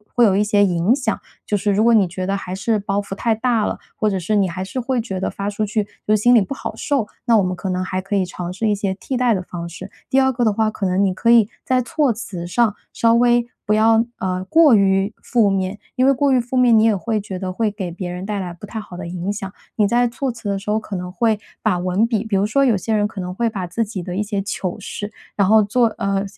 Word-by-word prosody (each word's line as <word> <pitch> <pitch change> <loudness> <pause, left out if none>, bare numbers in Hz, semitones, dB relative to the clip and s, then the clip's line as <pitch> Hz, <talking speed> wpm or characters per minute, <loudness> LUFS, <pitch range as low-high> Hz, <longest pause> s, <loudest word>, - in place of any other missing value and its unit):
会 245 - +5
有 205 -4 +5
一 - - +3
些 205 -1 +3
影 180 +5 +2
响， 250 -5 -2 0.3
就 210 - 0
是 205 +1 0
如 210 +2 +2
果 235 +1 +5
你 205 -4 +4
觉 185 +2 -5
得 195 +1 0
还 185 -1 -6
是 215 +3 0
包 200 0 -1
袱 200 - -7
太 225 +2 +1
大 230 -1 +1
了， - - -2 0.2
或 215 - +1
者 195 - -1
是 190 +4 0
你 195 -2 +3
还 185 +1 -4
是 195 +7 -4
会 255 0 -1
觉 195 -5 -5
得 190 - -1
发 200 +1 -4
出 205 +1 -2
去 210 +1 0 0.2
就 215 - +4
是 - - +3
心 245 +3 +5
里 240 - +7
不 200 - -3
好 - - -5
受， 275 -7 0 0.2
那 235 -2 +4
我 205 - +3
们 185 0 -1
可 190 +2 -5
能 185 0 -1
还 185 0 -2
可 195 +2 -3
以 195 - +2
尝 180 -1 -6
试 215 +3 -1
一 - - +3
些 195 -1 -1
替 250 +7 -4
代 245 -2 +3
的 190 - -1
方 170 -1 -6
式。 180 +3 -9 0.2
第 270 - +4
二 265 0 +3
个 240 -1 0
的 215 - +3
话， 220 +1 +1
可 210 - -4
能 185 +1 +2
你 190 -2 +1
可 230 +5 0
以 225 -3 +5 0.2
在 255 -1 +2
措 275 +1 +1
辞 185 -6 -6
上 215 +3 +1 0.2
稍 230 0 +3
微 240 0 +4 0.2
不 210 - +3
要， 225 +1 +4 0.2
呃， 185 0 -2
过 315 +3 +5
于 195 +1 +2
负 225 -4 +2
面， 190 +1 -1 0.2
因 255 -1 +2
为 275 - +5
过 275 +1 +2
于 260 - +4
负 245 +2 -4
面， 245 -3 +5
你 220 - +4
也 225 -2 +4
会 215 +3 -1
觉 195 -2 -6
得 185 0 -4
会 215 +4 0
给 195 -4 -5
别 180 +1 -5
人 180 +1 -5
带 205 0 -2
来 180 -2 -5
不 170 +4 -10
太 220 +2 -6
好 200 -4 -10
的 180 -1 -6
影 180 +2 -3
响， 195 -2 -6 0.2
你 210 - +3
在 240 +4 +3
措 255 +3 -3
辞 230 -2 -9
的 200 - 0
时 195 +2 -7
候 215 - +2
可 210 -2 -7
能 180 0 -5
会 220 +3 +1 0.2
把 210 -5 +1
文 185 +5 +1
笔 220 -3 0
比 220 -3 -2
如 195 - +2
说 275 +6 +2
有 240 -6 +3
些 220 +4 -1
人 205 -1 +2
可 210 - -9
能 180 0 -5
会 235 +2 +1
把 190 -5 -4
自 205 +7 -1
己 205 -3 -5
的 175 +1 -5
一 205 - 0
些 205 -1 -2
糗 190 -2 -3
事， 205 +1 -6 0.2
然 200 - +3
后 220 0 +7
做 230 +4 +2
呃， 195 0 0
205 Hz, 310 characters per minute, -20 LUFS, 190-230 Hz, 0.3 s, 里